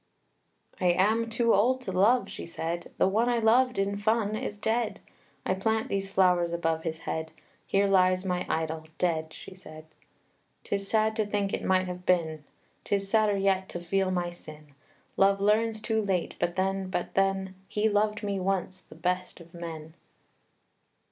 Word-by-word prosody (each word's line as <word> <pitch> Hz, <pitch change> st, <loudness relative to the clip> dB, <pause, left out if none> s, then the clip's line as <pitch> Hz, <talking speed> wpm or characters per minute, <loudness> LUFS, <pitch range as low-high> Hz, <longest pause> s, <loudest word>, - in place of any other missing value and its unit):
II. 180 Hz, -, +3 dB
"I -, -, -3 dB
am 225 Hz, +4 st, +2 dB
too 230 Hz, 0 st, +2 dB
old 250 Hz, +6 st, +3 dB
to 235 Hz, -, -5 dB
love," 210 Hz, +7 st, +3 dB
she -, -, -7 dB
said; 170 Hz, +1 st, -4 dB
"The -, -, +4 dB
one 225 Hz, +5 st, +2 dB
I 240 Hz, -, +2 dB
loved 245 Hz, +3 st, +3 dB
in 200 Hz, +1 st, 0 dB
fun 215 Hz, 0 st, +1 dB
is 210 Hz, -1 st, -4 dB
dead! 220 Hz, +1 st, -1 dB, 0.5 s
I -, -, +1 dB
plant 220 Hz, +3 st, 0 dB
these 195 Hz, 0 st, -2 dB
flowers 180 Hz, -3 st, +3 dB
above 165 Hz, -1 st, 0 dB
his 160 Hz, -1 st, -4 dB
head, 160 Hz, 0 st, -4 dB, 0.4 s
Here 200 Hz, +1 st, +2 dB
lies 185 Hz, -1 st, +3 dB
my 180 Hz, -1 st, -1 dB
idol, 160 Hz, 0 st, -2 dB
dead!" 160 Hz, -3 st, 0 dB
she -, -, -11 dB
said. 155 Hz, -4 st, -12 dB, 0.8 s
"'Tis 200 Hz, 0 st, -2 dB
sad 220 Hz, +1 st, +2 dB
to 215 Hz, -, +1 dB
think 205 Hz, -1 st, -1 dB
it -, -, -2 dB
might 185 Hz, 0 st, +2 dB
have 180 Hz, 0 st, -6 dB
been; 160 Hz, -4 st, +1 dB, 0.4 s
'Tis 195 Hz, -1 st, -1 dB
sadder 215 Hz, -2 st, +3 dB
yet 190 Hz, -1 st, +1 dB
to 175 Hz, -, -5 dB
feel 190 Hz, +2 st, 0 dB
my 175 Hz, -1 st, -1 dB
sin. 155 Hz, -4 st, -13 dB, 0.4 s
Love 195 Hz, 0 st, +4 dB
learns 215 Hz, +2 st, +2 dB
too 220 Hz, 0 st, 0 dB
late; 190 Hz, -4 st, -1 dB
but 175 Hz, -, -1 dB
then, 190 Hz, 0 st, -1 dB
but 180 Hz, -1 st, -3 dB
then, 195 Hz, -1 st, +1 dB
He 210 Hz, +2 st, +1 dB
loved 210 Hz, 0 st, +1 dB
me 200 Hz, -1 st, -1 dB
once 185 Hz, 0 st, -2 dB
the -, -, -16 dB
best 180 Hz, +3 st, -2 dB
of 170 Hz, 0 st, -15 dB
men. 160 Hz, -2 st, -7 dB
195 Hz, 175 wpm, -28 LUFS, 175-210 Hz, 0.8 s, The